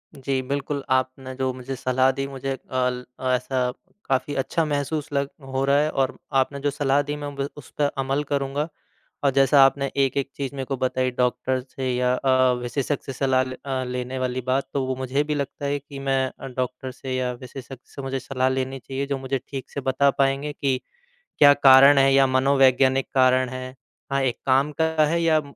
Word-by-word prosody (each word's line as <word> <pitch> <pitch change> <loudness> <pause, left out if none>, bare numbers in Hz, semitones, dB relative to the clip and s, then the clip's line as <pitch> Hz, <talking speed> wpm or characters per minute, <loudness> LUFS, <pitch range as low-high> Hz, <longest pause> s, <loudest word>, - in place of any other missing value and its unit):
जी, 135 -1 -2
बिल्कुल। 140 +1 -3
आपने 130 0 -2
जो 130 0 +1
मुझे 135 +2 -5
सलाह 130 +1 +2
दी 135 - -1
मुझे 135 0 -4 0.3
अल 125 0 -1 0.2
ऐसा 130 +1 0 0.5
काफ़ी 135 +2 0
अच्छा 165 +3 0
महसूस 145 +1 -2
लग 140 0 0 0.3
हो 135 - +1
रहा 140 +1 +4
है 150 +1 +2
और 130 - -3 0.2
आपने 140 +1 -3
जो - - +4
सलाह 140 -1 +2
दी 150 - -1
मैं 145 - -5
बिल् 140 0 -2
उस 145 - -11
पे 145 -1 +3 0.2
अमल 135 +2 0
करूँगा। 140 +2 -1 0.6
और 140 - +4
जैसा 135 +1 +5
आपने 140 +1 +1
एक-एक 135 0 +1
चीज़ 140 0 -4
मेरे 135 -1 -4
को 135 - -2
बताई 130 0 0
डॉक्टर 125 +1 +1
से 130 0 -5
या 125 0 +2
अ, 130 -1 +3
विशेषज्ञ 140 +3 -2
से 135 - -5
सलाह 130 -1 +2
ले 130 0 -6
अ, 130 -2 -2
लेने 125 +1 -4
वाली 130 0 -2
बात 135 +1 0
तो 135 -2 0
वो 130 - -2
मुझे 130 +3 -1
भी 150 0 -2
लगता 140 0 -4
है 145 0 0
कि 140 0 -10
मैं 135 0 +2 0.2
अ, - - -7
डॉक्टर 130 0 -4
से 130 0 -5
या 130 -1 -1
विशेषज्ञ 130 +2 -9 0.2
से - - -5
मुझे 135 0 -3
सलाह 130 0 0
लेनी 130 0 -2
चाहिए। 135 +3 -4
जो 140 -1 -1
मुझे 135 0 -2
ठीक 135 -2 -6
से 140 - -4
बता 135 +1 +2
पाएँगे 135 +2 0
कि 135 -2 -1 0.6
क्या 145 -1 +8
कारण 135 0 +7
है 135 0 +5
या 135 0 +6
मनोवैज्ञानिक 130 0 +3
कारण 130 -1 +4
है। 130 0 -7 0.4
हाँ, 140 - +2
एक 125 -3 0
काम 135 +3 +3
का 160 - +5 0.2
है 170 +3 +1
या 160 -1 +4
अ, - - -2
135 Hz, 205 wpm, -24 LUFS, 130-140 Hz, 0.6 s, क्या